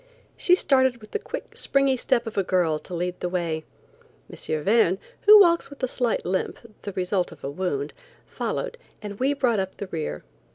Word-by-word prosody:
She 360 - +4
started 260 -7 +3
with 215 - -15
the 430 - -1
quick, 425 - -7
springy 275 -1 +2
step 245 -1 0
of 225 - -6
a 200 - +2
girl 175 -4 +1
to 180 - -11
lead 180 +1 -3
the 180 - -2
way. 170 -3 -2 0.7
M. 155 -1 -3
Verne, 200 -2 +3 0.3
who 425 0 +11
walks 340 -3 +4
with 280 -1 -13
a - - +3
slight 245 -2 -1
limp, 185 +1 -1 0.2
the 200 - -5
result 185 0 -1
of - - -14
a 140 - -3
wound, 145 -4 -2 0.3
followed, - - -4 0.2
and 205 -1 -7
we 275 +3 +2
brought 245 -6 +1
up 190 0 -4
the - - -4
rear. 155 - -5
200 Hz, 195 wpm, -25 LUFS, 180-265 Hz, 0.7 s, who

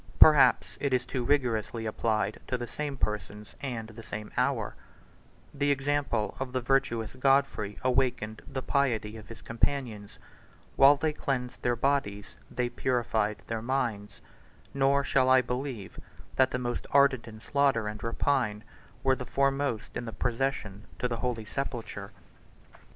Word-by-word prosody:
Perhaps 150 -3 +6
it 140 -2 0
is 130 0 +2
too 130 -3 -3
rigorously 120 -4 0
applied 110 -1 0
to 125 - -1
the 120 - -4
same 140 +3 -4
persons 105 -1 -4
and 120 -5 -4
the 110 +1 -10
same 105 -1 -7
hour; - - 0 0.8
the 145 0 0
example 140 -5 0
of 130 -1 -4
the 130 - +1
virtuous 120 -4 0
Godfrey 130 -6 +1
awakened 125 -4 0
the 130 -1 -4
piety 115 -6 0
of 110 -1 -10
his 115 - -11
companions; 115 -4 -2 0.6
while 140 +2 +8
they 155 +2 -1
cleansed 125 -4 -3
their 120 0 +1
bodies, 115 -6 -1 0.2
they 125 -1 -1
purified 115 -4 -1
their 115 -1 -3
minds; 115 -5 -2 0.5
nor 140 +1 +3
shall 130 -2 +3
I 130 0 +7
believe 125 -5 -4 0.4
that 130 0 +4
the - - -2
most 120 -1 -3
ardent 140 -4 +4
in 110 -1 -10
slaughter 135 -3 +1
and 105 -1 -5
rapine 115 -2 0 0.4
were 130 -1 +4
the 125 -1 -7
foremost 135 -2 0
in 120 - -3
the 115 - -6
procession 115 -3 -2
to 125 - 0
the 120 -1 -3
holy 115 -2 -2
sepulchre. 115 -5 -5
125 Hz, 150 wpm, -29 LUFS, 110-135 Hz, 0.8 s, while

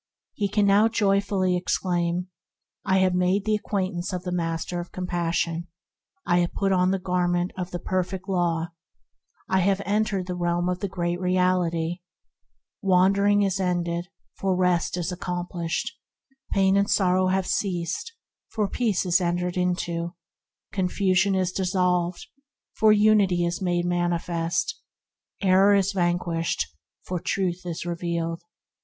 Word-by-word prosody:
He 205 - -1
can 205 +1 +2
now 200 +2 +5
joyfully 200 -4 +1
exclaim: 175 0 -1 0.5
"I 190 -1 +2
have 185 -1 +3
made 180 +2 +1
the 215 - +1
acquaintance 190 -4 -2
of 180 -1 -4
the 180 - -4
Master 165 0 -2
of 175 - -7
Compas 175 -2 -2
sion; 170 +1 -1 0.6
I 175 0 +3
have 175 -1 0
put 195 -1 0
on 180 -1 +3
the 195 - +1
Garment 180 -1 0
of 180 -1 -4
the 180 - -4
Perfect 185 +1 -3
Law; 170 -3 0 0.8
I 190 - +2
have 195 +1 +2
entered 205 -1 0
the 180 - -4
realm 175 0 0
of 180 0 -2
the 200 - -2
Great 175 -2 -2
Reality; 180 -2 +1 0.8
Wandering 200 +2 +4
is 195 -1 0
ended, 175 -1 -1 0.3
for 190 -1 +1
Rest 180 -1 +1
is 175 +1 -2
accomplished; 175 -1 -3 0.6
Pain 195 0 +3
and 200 +1 +2
sorrow 185 -1 +3
have 190 0 +1
ceased, 180 - -2 0.4
for 210 -2 -1
Peace 210 -3 0
is 180 +1 +3
entered 175 0 -1
into; 175 -1 -1 0.6
Confusion 190 0 +1
is 185 -1 0
dissolved, 180 -2 0 0.5
for 215 -1 +4
Unity 205 -4 +4
is 170 +1 -2
made 175 -1 0
manifest; 175 - -1 0.6
Error 195 +2 +5
is 195 0 +2
vanquished, 175 - 0 0.4
for 180 -1 -3
Truth 180 0 -2
is 170 0 -4
revealed!" 170 -1 -2
180 Hz, 140 wpm, -25 LUFS, 175-190 Hz, 0.8 s, now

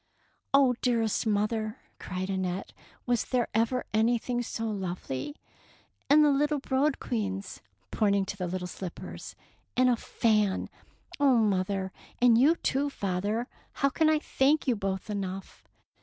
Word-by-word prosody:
'' - - -41 0.2
Oh, 270 -2 +5
dearest 230 -2 +1
mother,'^ 215 +1 0 0.2
cried 185 +1 -4
Annette, 190 0 -3 0.3
"was 240 -2 +1
there 250 -2 0
ever 230 +3 +1
anything 240 +2 +1
so 225 -1 -4
lovely; 185 - -4 0.7
and 300 +1 +7
the 295 - +5
little 295 +2 +2
brodequins," 240 -9 -1 0.3
pointing 200 -2 +2
to 200 - -5
the 185 -2 -3
little 180 +1 -3
slippers, 180 -1 -7 0.4
"and 255 0 +5
a - - +3
fan! 210 -4 +1 0.5
Oh, 275 -4 +5
mother, 195 -3 +1 0.3
and 245 -2 +6
you, 280 +8 +5
too, 285 -3 0
father, 205 +1 -2 0.3
how 275 - +2
can 310 +3 +2
I 310 - +4
thank 295 0 +1
you 250 - +3
both 195 -2 -3
enough? 190 - -5
220 Hz, 140 wpm, -29 LUFS, 195-255 Hz, 0.7 s, and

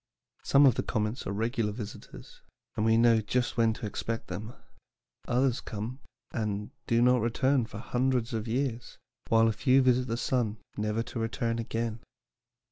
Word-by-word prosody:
Some 140 +1 +5
of 130 - +6
the - - -1
comets 110 +4 -2
are - - -2
regular 110 +1 -1
visitors, 105 -1 -9 0.3
and 105 - 0
we 110 0 +4
know 115 -1 +5
just 120 +4 -1
when 115 -2 +3
to 110 - -7
expect 115 +2 -4
them; 110 +3 -6 0.7
others 125 0 +1
come, 115 +5 -5 0.3
and 105 -2 -3 0.2
do 115 +1 +3
not 125 -1 +4
return 125 +2 +1
for 100 - -9
hundreds 125 +1 0
of 110 0 -2
years, 120 0 -2 0.3
while 115 0 +5
a 110 - +2
few 130 +4 +4
visit 125 0 +3
the 115 0 -2
sun 120 -3 0 0.2
never 105 +2 -1
to 120 - -6
return 115 0 -1
again." 115 0 -3
115 Hz, 165 wpm, -29 LUFS, 110-125 Hz, 0.7 s, of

